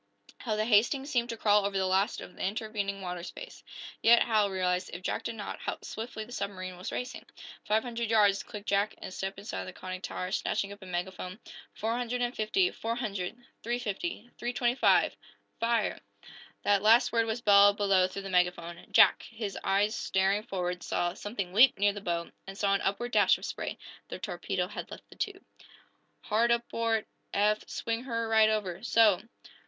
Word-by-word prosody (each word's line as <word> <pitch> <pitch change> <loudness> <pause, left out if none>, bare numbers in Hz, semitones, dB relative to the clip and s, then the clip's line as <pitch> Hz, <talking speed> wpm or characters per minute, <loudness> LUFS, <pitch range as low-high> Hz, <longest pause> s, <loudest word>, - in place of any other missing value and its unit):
How 220 -3 -2
the 215 0 0
"Hastings" 245 +6 +3
seemed 240 -1 +1
to 230 - -4
crawl 210 -1 +4
over 200 0 -1
the 190 - +1
last 190 +4 +1
of - - -10
the - - -10
intervening 200 -1 -2
water 180 -1 -4
space! 480 - -9 0.4
Yet 235 +1 +7
Hal 215 -3 +2
realized, 185 -1 0
if 175 +2 -7
Jack - - -2
did 230 - -3
not, 205 -2 -6
how - - -3
swiftly 220 0 -6
the 240 - -15
submarine 185 -5 -4
was 180 +1 -6
racing. 250 0 -5 0.4
"Five 215 +1 +2
hundred 235 -2 -3
yards!" 205 -3 +4
clicked 210 -3 -9
Jack, 200 +1 +1
and - - -8
stepped 190 +1 -4
inside 195 - -5
the - - -8
conning 185 0 -7
tower, 185 0 -4
snatching 200 +1 -1
up 205 0 -11
a 190 - -10
megaphone. 180 +2 -4 0.4
Four 225 +2 -1
hundred 245 0 -1
and 245 +1 -2
fifty 360 - +2
four 230 +1 -3
hundred 210 -3 -3 0.2
three 240 +2 -1
fifty 245 - -4
three 240 +1 -2
twenty 240 -1 +1
five! 260 - +3 0.4
"Fire!" 230 -1 +1 0.6
That 200 -1 +3
last 225 +3 +5
word 230 -1 +2
was 225 +2 -2
bellowed 205 -2 +6
below 195 -3 +3
through 195 +1 -7
the 195 - -6
megaphone. 180 -1 0
Jack, - - +6
his 215 -3 -5
eyes 200 +2 +2
staring 195 +2 +1
forward, 180 -3 -3
saw 175 0 -1
something 200 -4 -5
leap 245 +7 +6
near 205 +1 +3
the 205 - -7
bow, 170 -3 -2 0.2
and 195 0 -8
saw 200 -1 +2
an 200 - +1
upward 240 +5 -1
dash - - +5
of - - -8
spray. - - -4 0.3
The - - -6
torpedo - - -3
had - - -7
left - - -11
the - - -14
tube. 395 -1 -4 0.8
"Hard 230 +2 +2
aport, 230 -2 0 0.3
Eph! 210 +1 +1
Swing 230 +2 -3
her 230 -3 -2
right 220 -1 +5
over. 205 -5 -2
So!" 220 -5 +4
210 Hz, 190 wpm, -30 LUFS, 190-230 Hz, 0.8 s, Yet